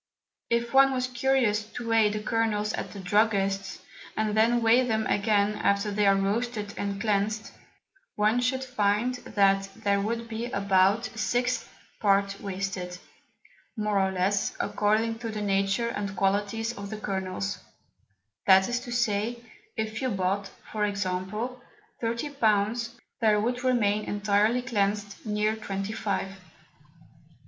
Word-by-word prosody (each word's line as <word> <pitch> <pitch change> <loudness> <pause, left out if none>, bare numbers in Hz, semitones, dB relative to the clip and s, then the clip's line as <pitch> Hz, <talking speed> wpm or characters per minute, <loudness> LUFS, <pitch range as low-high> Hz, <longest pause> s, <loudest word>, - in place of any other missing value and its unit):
If 235 +1 0
one 270 0 +6
was 255 -1 0
curious 250 -4 +1
to 240 - -6
weigh 225 -2 +4
the 210 0 -4
Kernels 215 -2 0
at - - -4
the 200 - -8
Druggists, 195 0 +1 0.4
and 215 -1 0
then 230 +2 +3
weigh 235 +3 +5
them 220 -3 0
again 205 0 +2
after 200 +1 +1
they 205 0 +2
are 195 - +6
roasted 210 +1 -1
and 200 -1 -3
cleansed, 215 +1 0 0.6
one 215 +3 +2
should 260 +1 0
find 235 -1 +1
that 195 -4 +2
there 200 -3 +1
would 230 +3 -2
be 225 +1 -4
about 200 +1 +2
a 225 - -8
sixth 245 +2 0 0.3
Part 200 -1 +2
wasted, 190 -2 -4 0.8
more 210 -2 +1
or 190 0 +2
less, 190 +2 0
according 220 +2 +1
to 230 -1 -4
the 215 -1 -4
Nature 200 +3 +1
and 200 -3 -4
Qualities 205 +4 0
of 200 0 -7
the 215 - -5
Kernels; 195 -1 -3 0.9
that 190 0 +7
is 240 0 -1
to 245 0 -9
say, 235 -1 0 0.4
if 220 0 -3
you 260 - 0
bought 195 -1 -1 0.2
(for 215 -1 -1
example) 205 +5 -2 0.4
30 235 +5 -2
Pounds, 225 -2 +1 0.3
there 215 -2 +4
would 245 +3 -1
remain 215 -5 +2
entirely 210 +4 +1
cleansed, 205 -3 -1
near 210 +1 +1
twenty 195 -1 -4
five. 200 -3 -2
210 Hz, 140 wpm, -27 LUFS, 200-230 Hz, 0.9 s, that